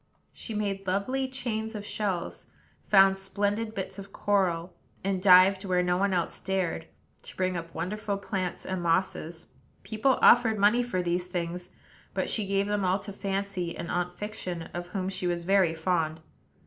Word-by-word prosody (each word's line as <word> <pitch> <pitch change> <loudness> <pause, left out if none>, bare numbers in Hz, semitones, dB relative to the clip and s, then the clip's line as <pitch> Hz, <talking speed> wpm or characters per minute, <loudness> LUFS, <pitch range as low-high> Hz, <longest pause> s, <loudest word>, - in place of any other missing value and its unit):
She 225 - -5
made 195 -2 -2
lovely 255 +8 0
chains 225 -4 -3
of 205 -1 -5
shells; 195 -5 -3 0.3
found 195 -1 +5
splendid 205 +3 -1
bits 190 0 -4
of 195 - -9
coral; 180 -4 0 0.3
and 190 -1 0
dived 190 +1 +7
where 180 -2 +1
no 180 0 +2
one 195 +2 +1
else 175 -2 -1
dared, 185 -4 -2 0.3
to - - -12
bring 185 -1 0
up 165 -1 -5
wonderful 205 +1 -2
plants 190 -3 -3
and 185 -1 -3
mosses. 170 -1 -1 0.4
People 230 +4 +1
offered 230 -2 +6
money 210 +4 +4
for 215 -7 -1
these 175 +1 -1
things; 175 0 -4 0.5
but - - 0
she 210 -3 0
gave 195 0 +1
them 205 -1 0
all 185 +1 +2
to 200 0 -8
Fancy 195 -3 -3
and 170 - -5
Aunt 180 0 0
Fiction, 180 -3 -5
of 175 0 -5
whom 185 0 -3
she 185 -1 -2
was 175 -1 -1
very 185 -2 +3
fond. 160 -1 0
190 Hz, 170 wpm, -28 LUFS, 180-205 Hz, 0.5 s, dived